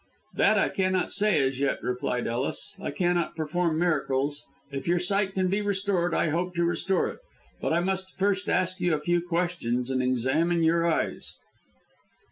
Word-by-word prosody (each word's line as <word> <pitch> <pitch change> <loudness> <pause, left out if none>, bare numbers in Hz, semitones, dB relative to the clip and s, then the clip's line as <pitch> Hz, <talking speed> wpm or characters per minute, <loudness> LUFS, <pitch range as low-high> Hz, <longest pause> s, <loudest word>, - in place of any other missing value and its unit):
"That - - +3
I - - +3
cannot 185 -1 0
say 210 -1 +3
as 130 0 -4
yet," 140 0 +1
replied 125 -1 -2
Ellis. 120 +4 -2
"I - - -3
cannot 175 +3 0
perform 160 +1 0
miracles. 145 -4 0 0.3
If 135 +2 -5
your 175 +1 +3
sight 195 +2 0
can 185 -1 +1
be 200 +3 0
restored, 195 -3 0
I - - +2
hope 175 +3 -2
to 170 - +1
restore 185 +2 +1
it. - - -9 0.4
But - - -1
I 170 +2 +2
must 190 +1 -3
first 200 0 0
ask 185 +1 0
you 175 -3 +2
a - - -3
few 175 +3 +1
questions 165 -8 -1
and 130 -1 +1
examine 135 +7 +1
your 165 +1 +3
eyes." 165 - -1
175 Hz, 175 wpm, -27 LUFS, 145-185 Hz, 0.4 s, That